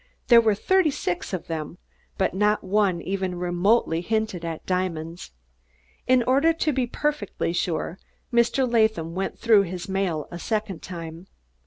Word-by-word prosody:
There 235 -2 +8
were 220 -2 +2
thirty 375 - +3
six 180 -10 -3
of 185 -4 -4
them, 160 0 -5 0.4
but 190 - +1
not 210 +2 +2
one 190 -3 +1
even 190 -1 -2
remotely 175 0 +1
hinted 215 -2 -2
at 165 -1 -5
diamonds. 175 -2 -3 0.8
In 255 -1 +4
order 275 +7 +3
to 315 -2 0
be 255 -2 0
perfectly 250 - -2
sure, 175 +1 -2 0.3
Mr. 240 +2 +3
Latham 220 -8 +1
went 190 +2 -3
through 220 -3 +5
his 180 -2 -5
mail 190 -6 -1
a 175 - -6
second 210 -3 -2
time. 170 0 -8
195 Hz, 150 wpm, -24 LUFS, 175-230 Hz, 0.8 s, There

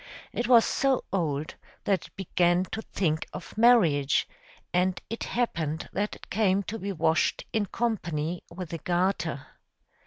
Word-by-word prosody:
It 240 - -1
was 240 -2 +7
so 270 -2 +1
old, 155 -5 -1 0.3
that 195 -2 0
it - - -28
began 175 -1 +2
to 220 - -3
think 160 -8 -1
of 170 - -8
marriage; 190 - +4 0.5
and 180 +1 +2
it 230 - -3
happened 160 -10 -2
that 205 +1 -1
it - - -15
came 200 -1 +2
to 225 +3 -5
be 200 +1 -3
washed 160 -3 +1
in 215 -2 +1
company 175 -9 -2
with 175 -1 -7
a 165 - -3
garter. 175 -5 0
185 Hz, 150 wpm, -28 LUFS, 160-215 Hz, 0.5 s, was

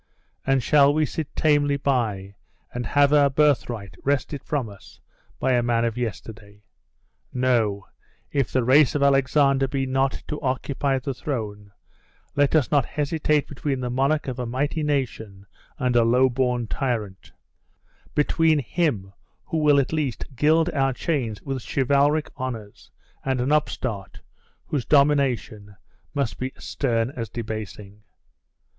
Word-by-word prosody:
And 135 -2 +2
shall 140 +1 +5
we 155 +1 +2
sit 155 0 -4
tamely 145 -2 +2
by, 110 -9 -1 0.4
and 120 -2 -3
have 145 +3 +3
our 145 -1 +5
birthright 130 -7 +1
wrested 140 0 -1
from 140 -6 -2
us 100 -2 -14 0.4
by - - +1
a 120 - +3
man 120 -1 +1
of 115 -1 -1
yesterday? 105 -1 -6 0.7
No; 115 -6 +1 0.5
if 140 -3 0
the 130 - +1
race 135 +3 +5
of 145 - +1
Alexander 135 0 +3
be 135 0 -2
not 135 +1 0
to 150 - -5
occupy 135 0 -1
the 130 +1 -3
throne, 105 -7 -5 0.6
let 145 +2 +2
us 150 -5 +2
not 145 -3 +4
hesitate 150 +1 0
between 140 -1 -3
the 125 -1 -3
monarch 140 +4 +1
of 130 -1 -4
a 125 - -3
mighty 145 +6 -1
nation 115 -9 -3 0.3
and 125 -1 0
a 120 - +5
low 125 +3 +4
born 125 -1 0
tyrant, 110 -6 -3 0.8
between 155 +1 +3
him 125 - -1 0.3
who 165 - -2
will 150 -2 +5
at 135 +3 -1
least 150 -6 -2
gild 155 +5 +3
our 135 -2 +1
chains 125 -6 -2
with 135 -2 -4
chivalric 140 +6 +1
honors, 120 -6 -7 0.3
and 130 -1 -1
an 125 +4 0
upstart, 125 -9 -2 0.4
whose 140 -5 -2
domination 135 -8 +1 0.4
must 140 -5 -2
be 130 +1 -3
as - - -15
stern 115 -3 -1
as 115 -5 -5
debasing!" 105 -3 -7
130 Hz, 145 wpm, -24 LUFS, 115-145 Hz, 0.8 s, shall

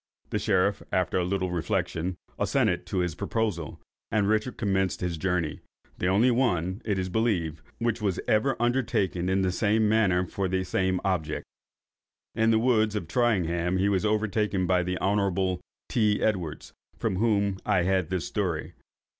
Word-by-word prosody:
The - - 0
sheriff, 100 +2 +1
after 90 0 +1
a - - +1
little 95 0 -1
reflection, 90 -1 -1 0.2
assented - - +1
to - - -3
his 90 -2 -1
proposal, 90 - -2 0.3
and 105 -2 +1
Richard 110 +4 0
commenced 95 -3 0
his 90 -2 -2
journey; 85 -3 -1 0.4
the 90 - 0
only 105 +7 +4
one, 95 -6 0
it 105 -3 -1
is 95 -1 -1
believed, 90 -7 0 0.2
which 115 -1 -1
was 100 -4 0
ever 130 +6 +2
undertaken 110 -7 0
in 95 0 +2
the 95 - +1
same 105 +3 +2
manner 100 -5 +3
for 95 +2 -2
the 95 0 0
same 95 0 0
object. 80 -6 -1 0.9
In 110 0 +2
the 110 - +4
woods 110 -3 +2
of 95 -6 -3
Tyringham 90 -5 +1
he 95 +2 +2
was 95 -1 +1
overtaken 105 -2 +1
by 90 0 +3
the 90 +1 -2
Hon. 95 -2 +1 0.3
T. 105 -3 +2
Edwards, 90 -8 -2 0.2
from 95 - -1
whom 100 -3 +1
I 100 -5 +2
had 95 -2 +1
this 90 -5 -2
story. 90 -7 -2
95 Hz, 165 wpm, -27 LUFS, 90-110 Hz, 0.9 s, only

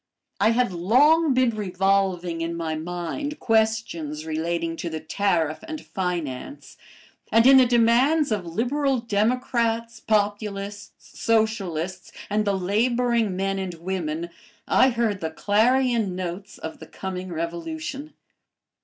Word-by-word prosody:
I 205 +3 +4
had 230 -3 +1
long 275 - +4
been 255 -2 +3
revolving 190 -4 0
in 165 0 -2
my 165 -1 -3
mind 175 - -4
questions 220 -9 0
relating 165 +1 -2
to 170 - -4
the 160 -1 -4
tariff 160 -2 0
and 315 -1 -5
finance, 180 - -5 0.6
and 225 +1 +5
in 270 +1 +9
the 255 -1 +6
demands 245 +5 +3
of 205 -4 0
liberal 265 - 0
democrats, 230 +1 0
populists, 205 -1 -2 0.3
socialists, 195 -6 -1 0.2
and 210 +1 +1
the 200 -1 +1
laboring 230 +2 +1
men 195 +1 -1
and 185 -2 -4
women, 170 -1 -4 0.4
I 260 - +5
heard 230 -5 -1
the 160 - -2
clarion 225 +2 +2
notes 185 +2 -6
of 160 - -7
the - - -11
coming 185 -1 -6
revolution. 275 - -5
205 Hz, 125 wpm, -24 LUFS, 175-235 Hz, 0.6 s, in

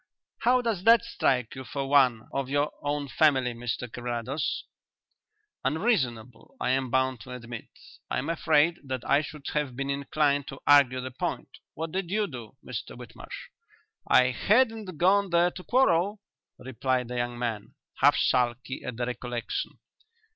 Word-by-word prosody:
How 250 +1 +3
does 220 -6 -1
that 230 +1 +7
strike 125 - 0
you 130 - -7
for 140 0 -4
one 130 -5 +3
of 135 -1 -2
your 145 +1 +1
own 145 0 -2
family, 130 -2 +3
Mr 120 +1 -4
Carrados?" 120 +4 -3 1.0
"Unreasonable, 135 - -1
I 125 - 0
am 130 -1 0
bound 130 0 +1
to 130 - -10
admit. 120 -2 -8 0.4
I - - -1
am 130 - -2
afraid 165 0 +2
that 130 -3 -5
I 140 - +4
should 150 -1 -9
have 145 -4 -1
been 140 +1 -2
inclined 140 0 0
to 135 - -8
argue 135 -3 +5
the 130 +1 -6
point. 125 - -4 0.3
What 160 +1 -4
did 190 -1 -3
you 210 +2 +1
do, 120 - -9
Mr - - -6
Whitmarsh?" - - -10 0.6
"I 125 0 +5
hadn't 215 - +1
gone 195 +3 +3
there 175 +1 +3
to 180 - -10
quarrel," 205 -5 +2 0.4
replied 130 0 -2
the 125 - -4
young 120 0 -2
man, 115 -4 -4 0.2
half - - +5
sulky 125 +1 0
at 115 - -5
the 120 - -1
recollection. 120 -1 -4
135 Hz, 155 wpm, -27 LUFS, 125-165 Hz, 1.0 s, that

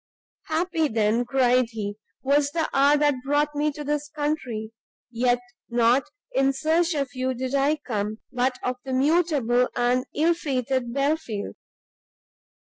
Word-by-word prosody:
"Happy 325 0 0
then," 220 -1 +1
cried 250 -1 +3
he, 205 -2 -4 0.3
"was 285 +1 +3
the 320 +1 -1
hour 280 +2 +5
that 295 0 +3
brought 290 +2 +1
me 295 +1 0
to 295 +1 -7
this 295 0 -2
country; 290 -8 -3 0.4
yet 245 +1 +2 0.3
not 240 +4 +3 0.2
in 270 +1 +3
search 320 +5 +1
of 275 -4 -2
you 255 0 -1
did 260 +2 -4
I 280 +2 +3
come, 215 -7 -3
but 250 0 0
of 250 0 -1
the 265 - -4
mutable 270 -4 +2
and 250 +2 +1
ill 325 +3 +3
fated 260 -5 -2
Belfield. 275 -6 -1
270 Hz, 140 wpm, -25 LUFS, 245-295 Hz, 0.4 s, hour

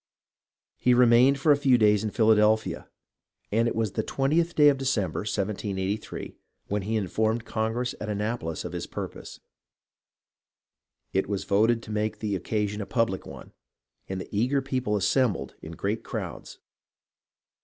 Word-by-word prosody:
He 125 -1 +3
remained 125 +3 +5
for 150 +3 +4
a - - +7
few 135 -3 +4
days 105 -2 +4
in 110 - -1
Philadelphia, 110 0 +2 0.6
and 115 +3 +2
it - - -2
was 110 -3 0
the 110 - -1
twentieth 155 +9 0
day 150 -1 +6
of 140 -2 +1
December, 110 -11 0
1783, 100 -1 -3 0.3
when 105 +1 0
he 110 +4 -2
informed 110 +3 0
Congress 115 +3 -2
at 105 - -4
Annapolis 105 -5 -3
of - - -5
his - - -5
purpose. - - -7 1.7
It 95 +1 0
was 100 -2 -2
voted 115 +3 +2
to 110 - -9
make 105 0 -1
the 105 -2 -2
occasion 105 +2 -2
a 100 - -5
public 115 -6 -1
one, - - -11 0.6
and 95 0 -3
the 95 - -8
eager 125 +7 +2
people 130 -5 -1
assem 120 +3 +2
bled - - -7
in 80 - -8
great 100 +7 -2
crowds. - - -6
110 Hz, 155 wpm, -26 LUFS, 105-120 Hz, 1.7 s, a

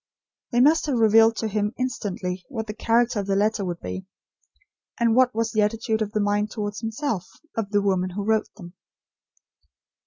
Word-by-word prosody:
They 240 -1 +3
must 310 +4 +4
have 270 -4 +1
revealed 225 0 +5
to 225 - -2
him 210 +1 -1
instantly, 190 -7 -3
what 225 -5 -4
the 210 - -5
character 230 +1 +1
of 200 - -4
the 195 - +1
letter 210 +1 +1
would 175 -2 -4
be; 190 0 -6 0.9
and 230 -1 +3
what 255 -2 +4
was 225 -1 0
the 215 - +2
attitude 220 +1 0
of 210 0 -3
mind 205 0 +1
towards 205 -2 -4
himself, 225 - -3 0.3
of 225 -3 -2
the 205 -1 +1
woman 185 -2 +1
who 200 +2 -4
wrote 220 0 +1
them. 175 -4 -11
215 Hz, 180 wpm, -24 LUFS, 205-230 Hz, 0.9 s, revealed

